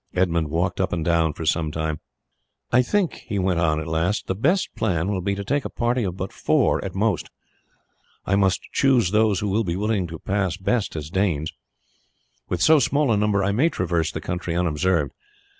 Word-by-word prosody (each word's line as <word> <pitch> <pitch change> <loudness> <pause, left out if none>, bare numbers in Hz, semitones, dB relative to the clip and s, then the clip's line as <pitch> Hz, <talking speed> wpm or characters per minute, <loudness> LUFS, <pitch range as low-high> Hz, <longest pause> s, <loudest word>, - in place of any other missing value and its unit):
Edmund 85 -4 +1
walked 85 +5 0
up 95 - 0
and 80 -2 -2
down 80 -2 +2
for 80 - -6
some 80 -1 +1
time. 80 -1 -3 0.7
"I 125 - +5
think," 185 +7 0
he 100 - -2
went 95 -2 +1
on 80 -2 +2
at 80 - -4
last, 80 +5 -1
"the - - -1
best 160 - +1
plan 90 -4 0
will 95 -2 -1
be 100 +2 -1
to 100 - -4
take 140 +6 0
a - - -4
party 120 0 0
of 90 -2 -3
but 95 0 -5
four - - +1
at 95 -1 -6
most. 105 -3 0 1.0
I 100 - +2
must 95 -1 +2
choose 125 -9 +3
those 105 -3 +2
who 105 - -1
will 105 +4 +1
be 85 -4 -2
able 105 +4 -2 0.2
to 80 0 -7
pass 95 0 -1
best 105 +2 -1
as 75 0 -5
Danes. 85 -6 0 1.0
With 90 - 0
so 160 -1 +6
small 140 0 +2
a - - +4
number 100 -1 +1
I 100 - +1
may 130 +11 +3
traverse 85 - -1
the - - -5
country 90 -1 -3
unobserved. 85 -2 +1
95 Hz, 205 wpm, -23 LUFS, 85-105 Hz, 1.0 s, so